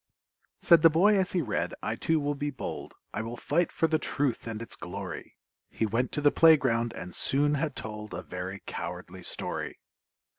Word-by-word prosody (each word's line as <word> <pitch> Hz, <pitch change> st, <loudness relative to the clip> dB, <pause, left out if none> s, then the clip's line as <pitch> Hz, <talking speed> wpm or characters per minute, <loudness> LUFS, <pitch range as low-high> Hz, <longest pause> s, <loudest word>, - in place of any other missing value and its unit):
Said 170 Hz, -2 st, +7 dB
the 165 Hz, -, +8 dB
boy 190 Hz, +7 st, +5 dB
as 190 Hz, -2 st, +1 dB
he 175 Hz, -3 st, +1 dB
read, -, -, -2 dB
"I -, -, -1 dB
too 160 Hz, -1 st, +1 dB
will 145 Hz, 0 st, 0 dB
be 145 Hz, +1 st, -2 dB
bold, 140 Hz, -, -6 dB, 0.2 s
I -, -, -2 dB
will 115 Hz, +2 st, -5 dB
fight 170 Hz, +4 st, +1 dB
for -, -, +1 dB
the 160 Hz, -1 st, +2 dB
truth 135 Hz, -6 st, -1 dB
and 110 Hz, -1 st, -4 dB
its 115 Hz, -, -6 dB
glory!" 95 Hz, +2 st, -7 dB, 0.3 s
He 110 Hz, -, -1 dB
went 115 Hz, +4 st, 0 dB
to 150 Hz, -, -1 dB
the 145 Hz, 0 st, +5 dB
playground, 130 Hz, -8 st, +5 dB
and 90 Hz, -, -7 dB
soon 145 Hz, -, +1 dB
had 150 Hz, -1 st, -1 dB
told 105 Hz, -2 st, -6 dB
A 90 Hz, -, -5 dB
very 90 Hz, +4 st, -6 dB
cowardly -, -, -6 dB
story! -, -, -5 dB
135 Hz, 190 wpm, -29 LUFS, 110-155 Hz, 0.3 s, the